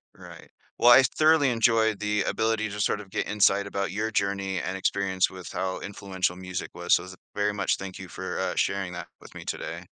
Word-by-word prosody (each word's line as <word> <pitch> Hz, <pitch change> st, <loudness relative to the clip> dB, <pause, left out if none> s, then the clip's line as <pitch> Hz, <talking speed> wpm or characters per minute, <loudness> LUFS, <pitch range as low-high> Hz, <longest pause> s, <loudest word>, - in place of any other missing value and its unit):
Right, -, -, -13 dB, 0.3 s
well, 120 Hz, -, +6 dB
I 130 Hz, +2 st, +9 dB
thoroughly 155 Hz, -1 st, +4 dB
enjoyed 115 Hz, -2 st, +2 dB
the 105 Hz, -1 st, 0 dB
ability 110 Hz, -1 st, 0 dB
to 105 Hz, 0 st, -4 dB
sort 105 Hz, -, +1 dB
of 100 Hz, -, -11 dB
get -, -, -2 dB
insight 100 Hz, -1 st, +3 dB
about 100 Hz, -1 st, -2 dB
your 105 Hz, +3 st, -1 dB
journey 100 Hz, -2 st, -1 dB
and 95 Hz, +2 st, -3 dB
experience 95 Hz, -1 st, +1 dB
with 95 Hz, -1 st, -9 dB
how 95 Hz, 0 st, -2 dB
influential 95 Hz, -3 st, -3 dB
music 90 Hz, 0 st, -6 dB
was, -, -, +3 dB
so -, -, -2 dB
th 90 Hz, 0 st, -10 dB, 0.2 s
very 105 Hz, 0 st, +1 dB
much 100 Hz, -2 st, 0 dB
thank 95 Hz, -1 st, -7 dB
you 95 Hz, -, -8 dB
for, 95 Hz, +1 st, -5 dB
uh, -, -, -1 dB
sharing 95 Hz, -2 st, -1 dB
that 90 Hz, -1 st, -6 dB
with -, -, -15 dB
me -, -, -9 dB
today. -, -, -5 dB
100 Hz, 210 wpm, -26 LUFS, 95-105 Hz, 0.3 s, I